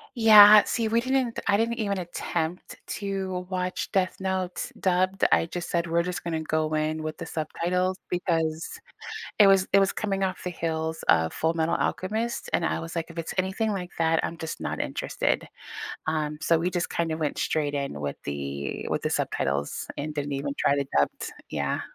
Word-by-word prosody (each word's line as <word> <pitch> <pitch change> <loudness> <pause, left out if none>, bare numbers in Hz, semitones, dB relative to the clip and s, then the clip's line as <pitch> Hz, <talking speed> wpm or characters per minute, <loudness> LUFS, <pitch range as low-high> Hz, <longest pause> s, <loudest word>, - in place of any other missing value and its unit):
Yeah, 215 -2 +10
see, 230 -2 0
we 230 +1 +3
didn't 255 -1 0
I 200 - +4
didn't 230 +2 +1
even 200 -3 -1
attempt 175 -1 -3 0.2
to 190 -2 -3
watch 185 -1 -2
Death 185 -1 +1
Note 190 -1 -2
dubbed. 185 +1 +2
I - - +4
just 175 +1 -5
said 170 0 0
we're 170 0 +2
just 180 +1 -4
gonna 165 -2 -2
go 155 0 0
in 155 +1 0
with 155 0 -5
the - - -6
subtitles 180 +4 -1
because 165 -3 0 0.7
it 210 - +8
was 195 -1 +5
it 200 - +7
was 195 0 +2
coming 195 -2 -2
off 185 0 -3
the 180 - -3
heels 160 -1 -3
of 80 0 +4
Fullmetal 165 +1 0
Alchemist, 220 +5 -2
and - - +2
I - - 0
was 165 +1 -7
like, 165 -1 -1
"If 170 - -9
it's 165 - -4
anything 190 +4 0
like 180 -3 -4
that, 165 0 +3
I'm 165 - -3
just 160 -1 -6
not - - -3
interested," - - -1 0.6
um, 155 -1 -1
so 165 0 +3
we 170 +3 0
just 180 -1 -2
kinda 165 -2 -1
went 155 -3 -2
straight 150 -2 0
in 140 - -3
with 70 -1 -3
the 70 -1 -4
with - - -1
the - - -1
subtitles 70 +2 -1
and 150 +2 -3
didn't 145 -1 -3
even 140 +1 -2
try 140 - +3
the 140 -1 -1
dubbed. 70 - 0 0.2
Yeah. - - -1
170 Hz, 190 wpm, -26 LUFS, 155-190 Hz, 0.7 s, Yeah